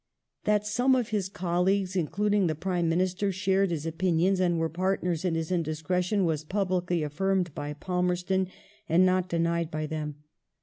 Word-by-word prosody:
^ -, -, -34 dB
That 210 Hz, 0 st, +2 dB
some 245 Hz, +5 st, +3 dB
of 245 Hz, -3 st, 0 dB
his 205 Hz, -4 st, -1 dB
colleagues, 190 Hz, 0 st, 0 dB
including 200 Hz, +3 st, +1 dB
the 155 Hz, -, -1 dB
Prime 175 Hz, 0 st, -1 dB
Minister, 185 Hz, +3 st, +1 dB
shared 190 Hz, +1 st, +1 dB
his 160 Hz, -3 st, -3 dB
opinions 175 Hz, +3 st, +1 dB
and 175 Hz, -2 st, +2 dB
were 165 Hz, 0 st, +1 dB
partnei 180 Hz, +2 st, -1 dB
s 160 Hz, -, -4 dB
in 175 Hz, -3 st, 0 dB
his 165 Hz, +1 st, -2 dB
indiscretion 180 Hz, +4 st, 0 dB
was 155 Hz, -2 st, 0 dB
publicly 180 Hz, -2 st, 0 dB
affirmed 180 Hz, +2 st, 0 dB
by 145 Hz, 0 st, -4 dB
Palmerston 180 Hz, +3 st, 0 dB, 0.4 s
and 175 Hz, +3 st, +5 dB
not 185 Hz, 0 st, +2 dB
denied 170 Hz, -1 st, 0 dB
by 155 Hz, -1 st, -3 dB
them. 150 Hz, -1 st, -4 dB
180 Hz, 170 wpm, -28 LUFS, 165-190 Hz, 0.4 s, and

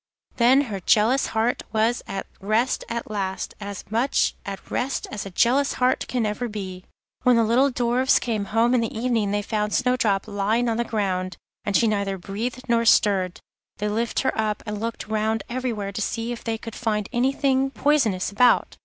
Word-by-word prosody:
Then 255 Hz, +3 st, +5 dB
her 215 Hz, -8 st, -4 dB
jealous 225 Hz, +8 st, +3 dB
heart 225 Hz, +2 st, 0 dB
was 225 Hz, +2 st, +1 dB
at 195 Hz, 0 st, -4 dB
rest—at 230 Hz, +2 st, -1 dB
least, 190 Hz, -2 st, -3 dB
as 200 Hz, -2 st, -7 dB
much 235 Hz, +5 st, +2 dB
at 195 Hz, -1 st, -7 dB
rest 260 Hz, +2 st, -1 dB
as 205 Hz, -2 st, -5 dB
a -, -, -6 dB
jealous 255 Hz, +9 st, +2 dB
heart 250 Hz, 0 st, +1 dB
can 245 Hz, -3 st, -1 dB
ever 210 Hz, +4 st, -2 dB
be. 190 Hz, -4 st, -6 dB, 0.4 s
When 250 Hz, -1 st, +4 dB
the 230 Hz, -, +4 dB
little 245 Hz, +5 st, +3 dB
Dwarfs 250 Hz, +1 st, +2 dB
came 220 Hz, -4 st, -2 dB
home 225 Hz, +4 st, +2 dB
in 250 Hz, -, +3 dB
the 230 Hz, -1 st, -3 dB
evening 230 Hz, -3 st, 0 dB
they 205 Hz, +1 st, -1 dB
found 210 Hz, 0 st, -1 dB
Snowdrop 235 Hz, -6 st, +1 dB
lying 215 Hz, +4 st, 0 dB
on 225 Hz, -, 0 dB
the 235 Hz, -, +1 dB
ground, 185 Hz, -5 st, -2 dB, 0.3 s
and 205 Hz, -, +2 dB
she 235 Hz, -, +3 dB
neither 200 Hz, -3 st, 0 dB
breathed 225 Hz, +7 st, -5 dB
nor 235 Hz, -1 st, +2 dB
stirred. 195 Hz, -5 st, +3 dB, 0.4 s
They 210 Hz, -, -1 dB
lifted 230 Hz, +5 st, -1 dB
her 260 Hz, -, +1 dB
up, 215 Hz, -1 st, -1 dB
and 210 Hz, -1 st, -4 dB
looked 230 Hz, 0 st, -4 dB
round 220 Hz, 0 st, 0 dB
everywhere 235 Hz, -5 st, -3 dB
to 205 Hz, -, -4 dB
see 230 Hz, +2 st, -2 dB
if 240 Hz, -, -6 dB
they 225 Hz, -1 st, -2 dB
could 225 Hz, 0 st, -8 dB
find 210 Hz, -4 st, -1 dB
anything 270 Hz, +2 st, +2 dB
poisonous 265 Hz, -11 st, +1 dB
about. 245 Hz, +4 st, +3 dB
225 Hz, 185 wpm, -24 LUFS, 205-245 Hz, 0.4 s, Then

